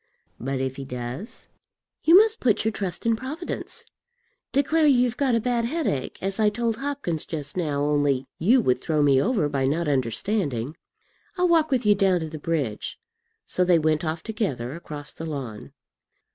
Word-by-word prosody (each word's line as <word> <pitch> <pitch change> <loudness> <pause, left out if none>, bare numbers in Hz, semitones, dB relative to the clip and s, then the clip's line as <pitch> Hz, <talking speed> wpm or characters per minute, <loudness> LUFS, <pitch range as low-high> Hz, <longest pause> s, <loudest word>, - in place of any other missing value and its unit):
"But 135 +2 -2
if 130 0 -2
he 135 - -5
does?" 125 - -7 0.6
"You 330 +3 +8
must 440 +2 +4
put 225 -4 +2
your 220 - +2
trust 195 -3 -4
in 230 -1 +3
Providence. 290 +9 -6 0.7
Declare 305 +3 +3
you've 250 -3 +3
got 265 -3 +2
a - - +3
bad 235 0 0
headache, 245 - -2
as 195 +2 -2
I 215 -1 +5
told 225 +1 -1
Hopkins 275 - -2
just 145 -3 -4
now; 150 -5 -1
only 145 -3 +1
you 240 +9 +4
would 125 - +1
throw 155 -2 +1
me 135 -2 +5
over 215 - +1
by 135 -2 0
not 160 +4 0
understanding. 140 - -1 0.6
I'll 360 0 +3
walk 325 -2 +4
with 255 -5 +1
you 210 - +6
down 190 -3 +2
to 160 - -4
the 155 0 -7
bridge." 145 -9 -2 0.5
So 180 - 0
they 180 -1 +4
went 155 0 +1
off 160 0 -3
together 150 - -3
across 150 -3 -8
the 165 - -6
lawn. 125 - -6
170 Hz, 175 wpm, -25 LUFS, 145-235 Hz, 0.7 s, You